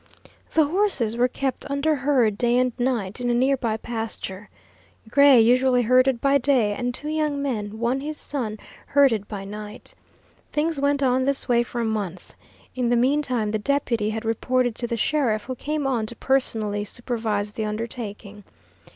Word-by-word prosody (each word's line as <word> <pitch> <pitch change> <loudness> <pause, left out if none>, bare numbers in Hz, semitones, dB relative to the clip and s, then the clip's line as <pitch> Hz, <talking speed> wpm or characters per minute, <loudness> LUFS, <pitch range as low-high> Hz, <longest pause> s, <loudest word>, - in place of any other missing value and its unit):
The 315 - +5
horses 295 - +1
were 245 +1 +3
kept 265 +2 -4
under 280 +3 +1
herd 260 -6 +2
day 240 +2 +2
and 250 -1 +2
night 240 -4 -1
in 245 - 0
a 240 - +2
near 265 +3 +3
by 230 -4 -2
pasture. 220 -4 -6 0.6
Gray 280 +1 +6
usually 250 +2 +4
herded 255 +1 +3
by 280 +2 +3
day, 250 -6 +2
and 245 +3 -2
two 295 +5 -6
young 305 -2 -1
men, 220 -7 -3
one 235 +4 0
his 300 +2 -5
son, 230 -7 -4 0.3
herded 250 -8 +3
by 200 -2 -6
night. 210 +2 -9 0.6
Things 305 0 0
went 285 0 +1
on 260 0 +2
this 280 0 -1
way 240 -2 +3
for 240 0 -4
a - - 0
month. 200 -5 -4 0.4
In 250 -2 -1
the 240 - +3
mean 265 +5 +3
time 240 -7 -1
the 215 - -1
deputy 235 -3 0
had 220 +1 -4
reported 245 +2 0
to 240 - -3
the 235 - -2
sheriff, 230 -4 +1
who 255 - -5
came 295 +3 -3
on 240 -5 0
to 235 - -6
personally 220 -7 0
supervise 215 -2 -3
the 220 - -3
undertaking. 210 -2 -6
245 Hz, 175 wpm, -24 LUFS, 220-275 Hz, 0.6 s, Gray